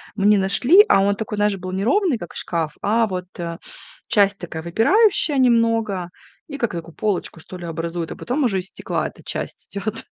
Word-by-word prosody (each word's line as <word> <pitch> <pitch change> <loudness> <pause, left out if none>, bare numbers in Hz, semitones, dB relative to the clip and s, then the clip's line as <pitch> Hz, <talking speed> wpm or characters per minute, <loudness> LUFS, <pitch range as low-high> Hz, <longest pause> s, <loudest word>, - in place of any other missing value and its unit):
мы 200 -1 -1
не 210 0 +6
нашли, 250 - +5
а - - +5
он 200 +1 +2
такой, 210 0 -5
знаешь, 205 -1 +1
был 185 0 -6
неровный, 255 - +1
как 175 -4 -10
шкаф, 160 -3 -2
а 225 +3 +2
вот, 180 -2 -4
э, 170 -1 -4 0.5
часть 200 -1 +3
такая 165 -2 -7
выпирающая 300 - +3
немного 230 -7 +2 0.4
и 285 - -7
как 235 -5 -1
такую 165 -1 -7
полочку, 200 -5 -2
что 180 +3 -10
ли, 175 - -8
образует, 165 0 -4
а - - -5
потом 270 +4 -2
уже 200 -6 +1
из 185 - -4
стекла - - -3
эта - - -14
часть - - -6
идет. 205 +2 -4
200 Hz, 195 wpm, -21 LUFS, 175-230 Hz, 0.5 s, не